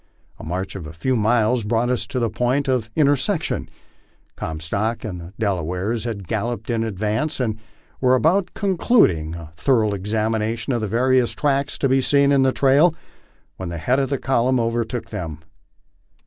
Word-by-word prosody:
A - - -9
march 90 +5 -4
of 85 -5 -6
a 80 - -9
few 125 +11 -1
miles 115 +1 +2
brought 115 +3 +1
us 125 - -1
to - - -4
the 115 -3 0
point 125 +5 0
of 125 -4 0
inter 145 -2 +4
section. 165 +6 -2 0.7
Comstock 90 +9 -3
and 90 -5 -5
the 85 +3 -11
Delawares 100 +2 -1
had 100 -6 -5
galloped 115 +2 -2
in 115 -1 0
advance, 110 +8 -2
and 110 -3 -2 0.4
were 130 0 +4
about 175 +8 +2
concluding 175 - +2
a 80 -2 -10
thorough 110 -3 +2
examination 110 +4 -1
of 120 - -1
the 110 - -1
various 125 +3 +2
tracks 140 -1 0
to 135 - +1
be 135 0 +3
seen 140 +1 +3
in 140 -1 +4
the 130 0 +4
trail, 145 +6 +4 0.6
when 95 -2 -5
the 85 - -5
head 125 - +1
of 135 -2 0
the 140 - 0
column 130 -1 +1
overtook 115 +1 -2
them. 80 -4 -5
115 Hz, 175 wpm, -22 LUFS, 100-130 Hz, 0.7 s, inter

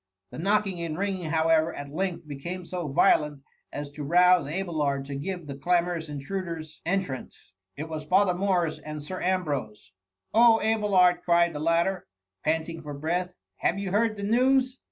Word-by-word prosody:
The - - -8
knocking 195 -1 +1
and 160 -2 -3
ringing, 190 -4 -2
how 160 0 +1
ever, 160 +1 +3
at 145 0 -7
length 180 -2 -3
became 170 +6 -6
so 175 -2 -4
violent, 145 +1 +2 0.3
as 145 -1 -6
to 150 +1 -7
rouse 175 -1 +4
Abelard 150 -6 -1
to 140 - -6
give 175 +4 -4
the 140 - -6
clamorous 170 +2 0
intruders 160 +1 -5
en 195 +2 +2
trance. 130 - -9 0.2
It 150 +3 -5
was 155 -1 -6
Father 185 +3 +3
Morris 180 -3 0
and 150 -1 -7
Sir 185 +5 -6
Am 185 +1 +1
brose. 110 - -5 0.2
" 95 0 -51
Oh, 230 0 +6
Abelard 200 -5 +3
!" - - -35
cried 170 -1 +3
the 150 - -5
latter, 170 +4 +1 0.4
panting 160 +1 -1
for 145 -2 -7
breath; 175 +5 -2
" - - -59
have 180 - +1
you 200 -2 -3
heard 215 +1 +1
the 200 - -5
news 255 +4 +2
170 Hz, 185 wpm, -27 LUFS, 150-190 Hz, 0.4 s, Oh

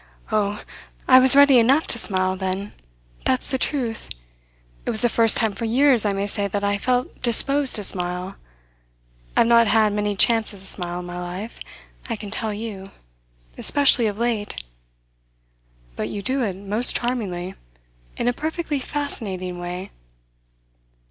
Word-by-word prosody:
"Oh, 210 -1 -1 0.4
I 255 0 +8
was 260 0 +8
ready 280 -3 +6
enough 270 +7 +3
to 235 - +2
smile 185 -3 +2
then. 190 +2 -4 0.5
That's 255 - +2
the 265 - -1
truth. 245 -7 -3 0.7
It - - -5
was 220 - +5
the 240 - +3
first 225 -2 +4
time 220 -3 0
for 230 - -5
years 250 0 +3
I 205 - +1
may 195 0 -2
say 205 0 -2
that 200 +1 -4
I 200 0 0
felt 250 +3 -2
disposed 270 +3 +4
to 210 - -3
smile. 180 0 -1 1.0
I've - - +5
not 235 0 +4
had 215 -1 +2
many 210 0 -2
chances 220 -1 +1
to - - -8
smile 175 -2 -4
in - - -10
my 175 0 -7
life, 185 +6 -7 0.5
I 230 - -2
can 210 -2 -9
tell 220 0 -3
you; 205 -2 -7 0.7
especially 275 -5 +3
of 205 -1 -4
late." 225 - -3 1.3
"But 105 - -4
you 200 - -6
do 260 +5 -1
it 200 -6 -2
most 205 +5 0
charmingly 195 -7 -3 0.6
in - - -2
a 245 - +2
perfectly 315 +1 -4
fascinating 195 -11 -5
way." 180 +2 -7
215 Hz, 155 wpm, -22 LUFS, 195-245 Hz, 1.3 s, I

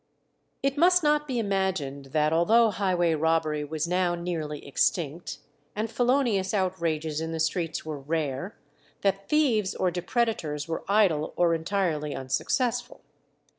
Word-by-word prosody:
It 275 +1 0
must 360 +1 +5
not 300 0 +2
be 255 -3 -2
imagined 190 -10 -1
that 150 +3 +1
although 220 +7 +4
highway 180 -4 +1
robbery 155 -1 +1
was 155 +2 -3
now 180 0 +1
nearly 165 -4 -4
extinct, 155 +3 -1 0.4
and 215 +2 -2
felonious 240 -7 +1
outrages 165 -5 -1
in 160 0 -3
the 160 - -3
streets 160 0 -1
were 155 -2 -5
rare, 150 +4 -3 0.4
that 195 0 0
thieves 240 -11 +2
or 185 - +1
depredators 175 - -1
were 165 - -3
idle 190 -7 +2
or 175 -1 +3
entirely 160 -4 -1
unsuccessful. 180 - -1
175 Hz, 135 wpm, -27 LUFS, 155-210 Hz, 0.4 s, must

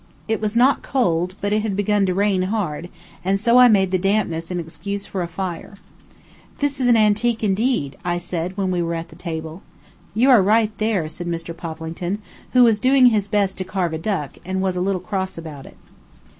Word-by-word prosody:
It 220 0 -1
was 215 +1 -1
not 255 +4 +4
cold, 180 -8 0
but 205 +1 0
it 215 - +2
had 210 -2 -2
begun 205 0 +1
to 185 - +1
rain 200 -1 +2
hard, 175 -6 -3 0.3
and 195 +2 +1
so 235 +4 +4
I 250 - +9
made 195 -5 +3
the 185 - +1
dampness 185 -4 0
an 180 -1 -2
excuse 200 +5 -5
for 190 - -4
a 175 - -2
fire. 180 +3 -6 0.8
"This 285 -1 -1
is 255 - +2
antique, 220 0 +3
indeed," 205 - 0
I 175 -1 -1
said, 175 +1 -4
when 190 -2 0
we 180 -1 0
were 170 0 -2
at 165 0 -5
the - - -14
table. 165 0 -6 0.5
"You 255 +5 +4
are 240 -5 +7
right 215 +2 +2
there," 215 -7 0
said 175 +2 -7
Mr. 165 0 -4
Poplington, 165 +3 -5 0.4
who 250 -1 +7
was 225 -3 +4
doing 260 +2 +5
his 205 -2 0
best 200 -2 0
to - - -1
carve 185 -3 -2
a 160 - -3
duck, 165 -6 -3
and 190 +1 -3
was 190 -1 0
a 180 - -1
little 190 0 0
cross 190 0 -3
about 155 -5 -8
it. - - -15
190 Hz, 210 wpm, -21 LUFS, 175-215 Hz, 0.8 s, I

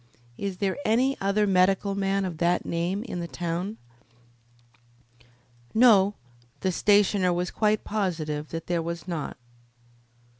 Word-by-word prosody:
"Is 195 +2 -4
there 195 +6 -1
any 255 +5 +2
other 200 +2 +2
medical 195 +1 +2
man 195 0 0
of 170 -4 -5
that 175 +1 +1
name 175 +5 -2
in 225 -7 -5
the 170 - -4
town?" 175 +5 -4 2.0
No, 210 -4 +6 0.5
the 190 - +1
stationer 200 -1 +3
was 175 0 -1
quite 215 -1 +1
positive 160 -8 -2
that 165 +1 -6
there 175 -1 0
was 170 +2 -5
not. 165 -5 -4
190 Hz, 125 wpm, -26 LUFS, 170-205 Hz, 2.0 s, No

